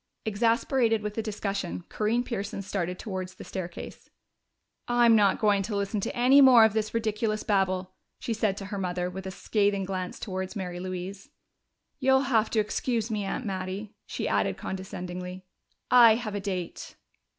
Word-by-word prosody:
Exasperated 225 +1 +2
with 210 -1 -3
the 225 - -2
discussion, 200 -4 -3
Corinne 225 +3 0
Pearson 200 -4 -4
started 180 -2 -3
towards 185 -3 -5
the - - -10
stairway. 175 -3 -6 0.9
"I'm 240 -1 +5
not 205 -3 +4
going 205 -2 +3
to 205 +2 -3
listen 200 +1 -1
to - - -3
any 255 +4 +6
more 250 -4 +8
of 220 - +2
this 215 0 -1
ridiculous 215 -1 -1
babble!" 185 -2 0 0.2
she 230 - -3
said 210 -3 0
to 195 - -6
her 200 0 -5
mother, 180 -1 -2
with 190 +1 -6
a - - -3
scathing 200 0 0
glance 185 -1 -4
towards 190 -1 -4
Mary 180 -3 -4
Louise. 185 +2 -6 0.7
"You'll 265 -1 +4
have 230 -5 +2
to 225 - +1
excuse 225 +1 -1
me, 210 -2 -1
Aunt 215 +5 -3
Mattie," 195 +1 -4
she - - -3
added - - +1
condescendingly. 180 -1 -6 0.5
"I 235 -3 +8
have 225 -3 -4
a 205 - -2
date." 185 -3 -5
205 Hz, 165 wpm, -27 LUFS, 185-225 Hz, 0.9 s, more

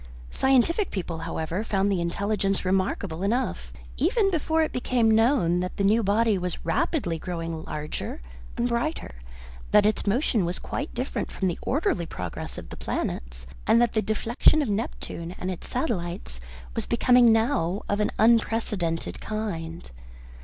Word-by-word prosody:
Scientific 270 - +3
people, 175 -4 -4
however, 165 +3 -3
found 200 -2 +1
the 185 -3 +1
intelligence 195 +3 -1
remarkable 185 -2 0
enough, 230 +7 -1 0.3
even 390 - +2
before 320 -1 +1
it 310 - -1
became 245 -2 +2
known 220 -6 +3
that 180 0 -3
the 200 - 0
new 215 +4 +4
body 210 0 +2
was 180 -2 -4
rapidly 170 - 0
growing 165 -2 -4
larger 150 0 -4 0.4
and 240 - +1
brighter, 240 - -2 0.6
that 210 - +5
its 215 0 +1
motion 225 -1 +2
was 175 +1 -2
quite 285 - -5
different 250 +3 -3
from 190 - -1
the 175 - -2
orderly 270 - 0
progress 90 - -5
of - - -8
the - - -8
planets, - - -3 0.2
and 230 - +6
that 240 -1 +3
the 220 - +2
deflection 235 +8 +3
of 255 - -3
Neptune 190 -4 -4
and 185 - -3
its 180 - -7
satellite 175 - -2 0.3
was - - -2
becoming 240 0 +5
now 220 - +1
of 205 - 0
an 210 - +2
unprecedented 220 -7 +1
kind. 170 - -4
205 Hz, 155 wpm, -26 LUFS, 175-240 Hz, 0.6 s, and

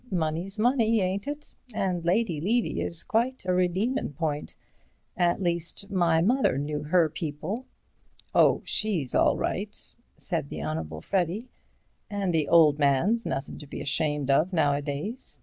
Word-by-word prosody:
Money's 175 +3 -2
money, 230 -1 +3
ain't 190 +3 -1
it? 295 +1 -6 0.2
And 180 -3 -1
Lady 175 -3 +1
Levy 230 +7 +1
is 170 -1 -4
quite 240 +1 0
a 185 - +1
redeemin' 185 - 0
point. 150 -1 -3 0.6
At 175 +1 +1
least, 175 +3 -2
my 170 -4 +3
mother 245 - +2
knew 150 +1 -2
her 170 +1 +4
people." 160 - -5 0.7
"Oh, - - +4
she's 180 - -1
all - - +4
right," - - -3 0.4
said - - -3
the 75 -1 -5
Honourable 80 0 -4
Freddy, 195 - -1 0.6
"and 200 -3 -1
the 155 -3 +1
old 155 -3 +5
man's 155 - +2
nothing 135 - -4
to 150 - -10
be - - -7
ashamed 145 -1 0
of 155 +7 +3
nowadays. 145 - -1
175 Hz, 145 wpm, -27 LUFS, 150-205 Hz, 0.7 s, old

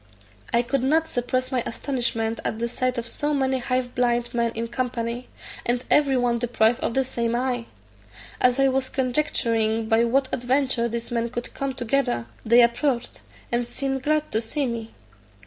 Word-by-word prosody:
I 235 - +3
could 270 +2 0
not 315 +5 +2
suppress 255 -1 -1
my 255 -2 +1
astonishment 230 -3 -2
at - - -2
the 235 +1 -1
sight 255 +1 -1
of 235 - -2
so 295 +5 -1
many 265 -1 +1
half 255 0 -1
blind 240 0 +1
men 235 -1 +1
in 230 +1 -2
company, 240 0 -3 0.4
and 245 +1 0
every 280 -3 +4
one 240 -1 +1
deprived 235 -1 +2
of 230 - -2
the 265 - +3
same 235 -2 -1
eye. 245 -1 -1 0.7
As 250 +1 +3
I 270 - +5
was 265 0 0
conjecturing 230 -5 0
by 225 +1 +4
what 265 +3 +2
adventure 255 -1 +1
these 235 +1 -4
men 235 0 0
could 240 0 -5
come 275 -1 -2
together, 240 - 0 0.2
they 235 +2 +6
approached, 235 +1 0 0.3
and 240 0 0
seemed 270 +2 -2
glad 305 +2 0
to 220 - +1
see 275 +5 -1
me. 230 -2 -4
245 Hz, 175 wpm, -24 LUFS, 235-265 Hz, 0.7 s, they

